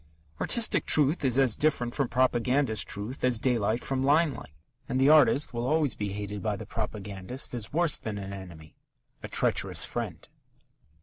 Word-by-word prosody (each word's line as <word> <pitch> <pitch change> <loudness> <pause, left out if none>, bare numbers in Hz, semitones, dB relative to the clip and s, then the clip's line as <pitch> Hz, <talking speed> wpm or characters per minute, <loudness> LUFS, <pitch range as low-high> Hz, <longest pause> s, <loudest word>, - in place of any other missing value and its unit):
Artistic 235 -2 +3
truth 150 +2 +3
is 130 -2 +2
as 130 -5 +3
different 125 -6 -1
from 140 -3 -1
propagandist 125 -2 +1
truth 105 +7 -6
as 125 -2 +3
daylight 115 -2 0
from 135 -1 -2
limelight, 140 - 0 0.3
and 130 0 -1
the 135 +2 +4
artist 150 -3 +4
will 120 +1 -3
always 150 -1 +1
be 105 -1 -4
hated 105 0 -6
by 105 -2 -2
the 105 - -8
propagandist 105 +2 -5
as 115 -4 -4
worse 165 0 +2
than 105 -2 -5
an 100 -1 -7
enemy 85 -5 -11 0.5
a - - -7
treacherous - - +2
friend. - - -6
120 Hz, 165 wpm, -27 LUFS, 105-140 Hz, 0.5 s, the